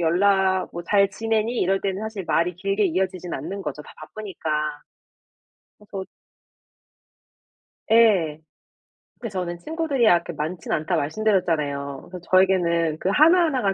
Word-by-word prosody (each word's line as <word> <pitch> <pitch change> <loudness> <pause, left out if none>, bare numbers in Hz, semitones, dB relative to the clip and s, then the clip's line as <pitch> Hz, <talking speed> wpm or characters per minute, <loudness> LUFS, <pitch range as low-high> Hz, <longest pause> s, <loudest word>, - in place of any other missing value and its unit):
연락 190 +2 +2
"뭐 175 - -6
잘 200 +2 +3
지내니?" 225 +3 -1
이럴 195 +1 +1
때는 195 0 -2
사실 220 -4 -5
말이 175 +2 +1
길게 195 +3 0
이어지진 185 0 -2
않는 185 +8 -5
거죠 150 0 -5
다 - - -14
바쁘니까. 200 -7 -7 1.3
그래서 195 -2 -8 1.9
예. 195 -10 +4 0.8
그 230 - -4
저는 180 -3 -4
친구들이 300 - 0
아 - - +7
그렇게 - - -8
많진 160 +3 -5
않다 165 +3 0
말씀드렸잖아요. 150 -6 -1
그래서 180 - -7
저에게는 170 -4 +3
그 185 - -1
하나하나가 305 - +4
190 Hz, 300 characters per minute, -23 LUFS, 170-210 Hz, 1.9 s, 아